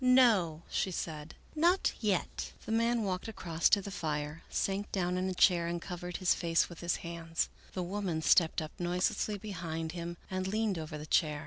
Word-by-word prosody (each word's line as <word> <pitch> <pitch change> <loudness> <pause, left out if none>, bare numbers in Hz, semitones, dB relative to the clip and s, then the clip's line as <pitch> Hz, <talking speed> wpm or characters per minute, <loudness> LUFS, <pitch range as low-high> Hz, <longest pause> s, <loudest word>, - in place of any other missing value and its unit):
" - - -6
No," 220 -11 +5
she - - 0
said, 160 -3 -5
" - - -26
not 345 +5 +3
yet." 205 -5 -1
The - - -4
man 230 +1 +2
walked 185 -1 -2
across 170 -6 +1
to 200 -2 +4
the 200 - -6
fire, 150 -2 -3
sank 195 +1 -1
down 180 -2 0
in 185 +1 0
a - - -1
chair, 175 -2 +4
and 170 0 -2
covered 175 0 -5
his 185 -1 +3
face 165 -1 +2
with 170 - -11
his 175 0 0
hands. 165 -1 -2 0.2
The 185 - -2
woman 180 -3 -2
stepped 160 -1 +4
up 155 - -7
noiselessly 180 +4 0
behind 165 -6 -4
him 170 0 -5
and 185 0 -1
leaned 210 -2 0
over 155 -1 -5
the 150 - -7
chair. 155 -2 +2
175 Hz, 200 wpm, -32 LUFS, 165-200 Hz, 0.2 s, No